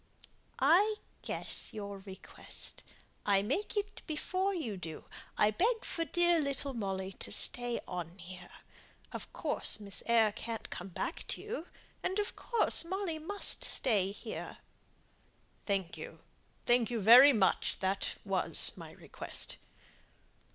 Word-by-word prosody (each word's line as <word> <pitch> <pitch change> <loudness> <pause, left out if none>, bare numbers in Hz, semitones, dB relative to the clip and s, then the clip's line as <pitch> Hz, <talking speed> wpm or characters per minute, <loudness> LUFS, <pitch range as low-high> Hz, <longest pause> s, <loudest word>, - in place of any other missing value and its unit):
"I 370 +10 +5 0.3
guess - - -2
your 200 -2 -5
request. 190 -1 -8 0.4
I 200 -1 +3
make 385 - -1
it 410 0 -2
before 370 +5 0
you 310 - -3
do. 165 -4 -7 0.3
I 210 - +5
beg 450 - +1
for 330 - -2
dear 345 0 +3
little 280 -1 -2
Molly 195 -4 -3
to - - -2
stay 245 -1 0
on 175 -1 -5
here. 180 0 -9 0.6
Of - - -6
course - - +1
Miss 200 -2 -5
Eyre 225 -2 +5
can't 225 +2 -6
come 180 - -5
back 185 - -4
to - - -3
you; 425 -6 -5 0.3
and 380 - -1
of 415 -1 -1
course 465 -7 +2
Molly 355 -2 -2
must 400 +6 +1
stay 200 -7 +1
here!" 200 - -7 1.1
"Thank 195 -4 -1
you; - - -9 0.4
thank 240 -1 +4
you 235 -2 -1
very 245 +7 +10
much. 205 -7 +2
That 190 +1 -1
was - - +3
my - - -10
request." - - -6
235 Hz, 135 wpm, -33 LUFS, -, 1.1 s, very